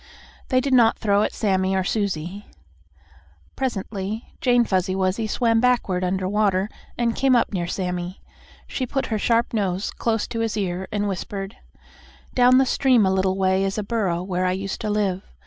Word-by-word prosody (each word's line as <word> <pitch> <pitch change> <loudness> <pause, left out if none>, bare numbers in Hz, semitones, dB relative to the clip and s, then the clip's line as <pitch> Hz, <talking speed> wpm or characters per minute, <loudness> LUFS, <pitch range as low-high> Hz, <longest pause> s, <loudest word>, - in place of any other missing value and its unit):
They 255 - +3
did 270 0 -1
not 235 -3 +5
throw 205 -1 +2
at - - 0
Sammie 190 -2 0
or 190 - +1
Susie. 195 -1 -2 1.1
Presently 215 -3 -4
Jane 245 -2 +4
Fuzzy 185 -1 0
Wuzzy 190 +4 0
swam 230 +1 +2
backward 235 -7 +1
under 185 +1 -1
water 200 -1 +1 0.3
and 235 -1 0
came 270 -1 +3
up 235 -2 +1
near 175 -3 -1
Sammie. 180 0 -3 0.5
She 255 - -3
put 270 +1 -1
her 215 - 0
sharp 230 +2 +1
nose 195 -3 -1
close 225 -2 -1
to 230 - -3
his 225 -1 -1
ear 190 -2 -2
and 205 0 -1
whispered: 195 +1 -5 0.8
"Down 255 +1 +5
stream 255 -4 +3
a 190 - +2
little 190 0 +1
way 190 0 +2
is 195 +1 -2
a 210 - -1
burrow 195 -6 -1
where 185 -1 -1
I 180 - +1
used 195 +1 -4
to 215 - -2
live. 200 -3 0
200 Hz, 175 wpm, -23 LUFS, 190-230 Hz, 1.1 s, not